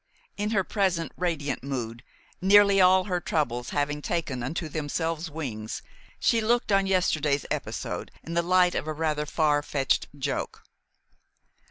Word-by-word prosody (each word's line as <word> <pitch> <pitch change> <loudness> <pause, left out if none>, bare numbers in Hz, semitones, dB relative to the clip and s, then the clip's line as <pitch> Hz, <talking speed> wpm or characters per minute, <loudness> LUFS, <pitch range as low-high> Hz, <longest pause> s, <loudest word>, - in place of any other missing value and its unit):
In 205 +1 -2
her 205 -3 +2
present 185 -5 0
radiant 155 -7 -2
mood, 120 -3 -4 0.4
nearly 200 +1 +6
all 185 0 +6
her 180 -2 -2
troubles 125 -7 -1
having 150 0 -1
taken 150 -7 -2
unto 155 +6 -3
themselves 160 +2 -2
wings, 120 -9 -5 0.4
she 230 -2 +3
looked 235 0 +1
on 195 -1 +3
yesterday's 155 -6 +1
episode - - -3
in 165 - -6
the 170 - +2
light 180 +1 +3
of - - -2
a 155 - -1
rather 150 -1 -1
far 150 -2 +2
fetched 140 -2 0
joke. 140 0 -3
160 Hz, 145 wpm, -27 LUFS, 145-185 Hz, 0.4 s, nearly